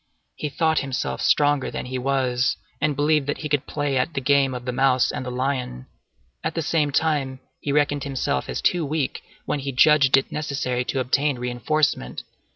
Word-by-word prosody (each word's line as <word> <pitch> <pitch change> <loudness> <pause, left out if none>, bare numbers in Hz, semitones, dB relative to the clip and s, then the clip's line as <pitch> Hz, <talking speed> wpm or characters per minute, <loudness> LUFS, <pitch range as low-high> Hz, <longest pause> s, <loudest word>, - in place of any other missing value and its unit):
He 150 - -3
thought 160 +2 +1
himself 135 -2 -3
stronger 145 -2 +3
than - - -5
he 130 0 -4
was, 130 -1 +1 0.2
and 150 -1 +1
believed 150 0 +2
that 145 - -1
he 150 - -5
could 145 -1 0
play 145 -2 -1
at 130 +6 -1
the - - +1
game 135 -1 +2
of 125 -1 -7
the 125 - -1
mouse 130 0 +3
and - - -4
the 125 - -5
lion. 125 - -2 0.6
At - - -2
the 165 - -1
same 150 -1 +1
time, 140 -3 0 0.2
he 145 - -3
reckoned 145 -1 +1
himself 130 - -2
as - - -3
too 175 -2 +2
weak, 150 -2 -2 0.2
when 150 - -1
he 140 0 -3
judged 135 0 +5
it 135 - -1
necessary 135 -4 -2
to 135 - -2
obtain 140 +2 +1
reinforcement. 125 - -1
140 Hz, 190 wpm, -23 LUFS, 130-145 Hz, 0.6 s, judged